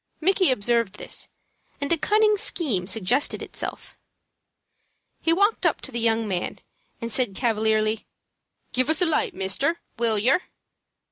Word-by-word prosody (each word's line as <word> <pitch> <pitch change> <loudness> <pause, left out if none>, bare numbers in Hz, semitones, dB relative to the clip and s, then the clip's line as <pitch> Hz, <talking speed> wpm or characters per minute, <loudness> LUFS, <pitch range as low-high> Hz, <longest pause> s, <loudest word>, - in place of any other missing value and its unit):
Micky 370 +1 +3
observed 235 -3 +1
this, - - -6 0.5
and 285 +3 +1
a - - +5
cunning 425 +7 +3
scheme 250 - 0
suggested 225 +7 +1
itself. - - -7 1.2
He 325 - +2
walked 405 +6 +2
up - - +2
to - - -7
the 235 - -3
young 225 -1 +1
man, 180 -3 -3 0.4
and 230 -2 -5
said, 245 -7 +1
cavalierly, 220 -2 0 0.7
"Give 255 +3 +1
us 320 +4 +3
a - - +4
light, 320 -2 0
mister, 195 - 0 0.2
will 230 -2 +3
yer?" 255 - +3
240 Hz, 140 wpm, -24 LUFS, 215-325 Hz, 1.2 s, a